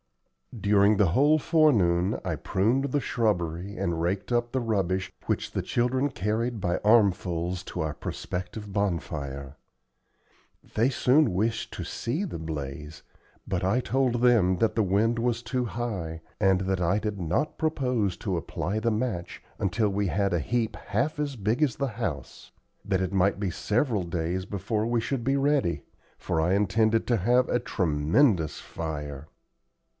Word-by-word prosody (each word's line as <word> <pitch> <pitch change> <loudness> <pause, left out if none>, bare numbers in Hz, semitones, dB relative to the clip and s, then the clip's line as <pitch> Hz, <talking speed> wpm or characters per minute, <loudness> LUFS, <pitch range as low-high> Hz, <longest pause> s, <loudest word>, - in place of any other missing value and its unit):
During 100 0 +4
the 95 -4 +4
whole 145 +6 +5
forenoon 105 - +3
I - - -1
pruned 115 +8 +1
the 140 +1 0
shrubbery, 100 - -1
and 85 -1 -1
raked 95 +7 -1
up 120 0 +1
the 130 - 0
rubbish 95 -6 -1 0.2
which - - -1
the - - -1
children 130 +3 0
carried 115 +1 -2
by 90 -2 0
armfuls 95 -5 +2
to - - -4
our 80 -1 -2
prospective 95 +6 -6
bonfire. 75 -8 -3 1.2
They 115 +4 +3
soon 135 -1 +3
wished 110 +5 -1
to - - -4
see 150 +13 -2
the 170 - -6
blaze, 75 -1 -6 0.4
but 90 -2 -1
I 100 +7 +2
told 130 -1 +1
them 110 -7 +4
that 115 +4 +1
the 110 - +3
wind 110 +5 +2
was 120 0 0
too 125 +2 -1
high, 100 -10 -4 0.2
and 95 -2 +3
that 95 -1 -1
I 90 +4 +2
did 105 -1 -3
not 90 - -1
propose 125 - 0
to 95 -3 -2
apply 90 +6 -3
the 115 +1 +1
match 110 -6 -3 0.2
until 105 +3 +1
we 100 0 0
had 100 +1 0
a 85 - +2
heap 115 +7 -1
half 135 +11 -2
as 145 -2 -2
big 110 +5 -1
as 140 -6 +2
the 140 - -1
house; 95 - -5 0.3
that 95 -1 0
it 95 +1 -2
might 95 +1 +2
be 100 -3 -1
several 110 - 0
days 85 +2 -2
before 105 +2 -2
we 120 0 +1
should 120 +2 -2
be 135 +3 +1
ready, 135 - +1 0.3
for 80 - -1
I 90 +4 +2
intended 110 +3 +2
to 120 - +3
have 125 +6 +3
a 120 - +1
tremendous 85 - +1
fire. 75 -3 -6
105 Hz, 160 wpm, -27 LUFS, 90-120 Hz, 1.2 s, whole